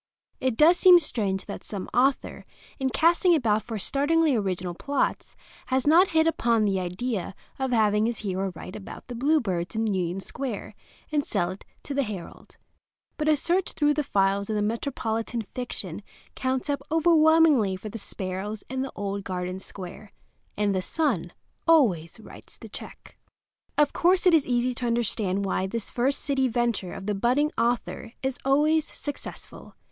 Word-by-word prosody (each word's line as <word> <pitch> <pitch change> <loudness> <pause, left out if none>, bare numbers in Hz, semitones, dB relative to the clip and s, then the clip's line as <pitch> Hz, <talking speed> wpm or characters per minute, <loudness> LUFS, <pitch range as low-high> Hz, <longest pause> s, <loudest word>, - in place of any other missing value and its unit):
It 255 -3 -1
does 335 +4 +6
seem 365 -1 +8
strange 205 - -1
that - - -7
some 200 -3 -6
author, 265 +2 +1 0.4
in 265 -1 +1
casting 340 +5 +4
about 220 -7 +2
for 225 +1 -5
startlingly 290 +6 +2
original 185 -4 -2
plots, 280 +10 -2 0.3
has 260 0 +1
not 335 +6 +6
hit 320 -2 +3
upon 235 -9 +2
the 195 -2 +1
idea 185 +2 -3 0.2
of 265 0 0
having 215 -2 +3
his 235 - -3
hero 190 0 -1
write 185 - -9
about 205 - -9
the 245 - -8
bluebirds 230 - 0
in 220 +1 0
Union 185 -3 -1
Square 240 +2 -5 0.4
and 295 -1 +1
sell 180 -8 -1
it 190 - -10 0.2
to 285 - -5
the 280 - +1
Herald. 210 -8 -7 0.6
But 305 - -1
a 305 - +5
search 350 +5 0
through 295 -1 +2
the 300 - 0
files 200 -4 +1
of 215 - 0
metropolitan 225 0 -2
fiction 250 -1 -5 0.3
counts 260 +1 -2
up 285 -2 -1
overwhelmingly 315 - +5
for 200 +3 -7
the 225 - -7
sparrows 195 +2 -5
and 260 0 -1
the 270 - -5
old 200 -1 -3
Garden 185 -1 -4
Square, 190 +2 -10 0.4
and 205 -1 +1
the 185 - 0
Sun 220 - -1 0.4
always 225 - +3
writes - - -14
the - - -11
check. - - -10 0.6
Of 295 -1 +3
course 360 +2 +3
it 360 - +6
is 315 -4 +4
easy 245 0 +1
to 245 0 -3
understand 215 -4 0
why 190 0 0
this 225 +2 -4
first 265 +3 0
city 270 -2 +1
venture 235 -6 -1
of 195 - -7
the 210 - 0
budding 250 +9 +2
author 235 -1 -1
is 265 -1 -2
always 300 +3 +2
successful. 290 - -8
235 Hz, 165 wpm, -26 LUFS, 200-285 Hz, 0.6 s, seem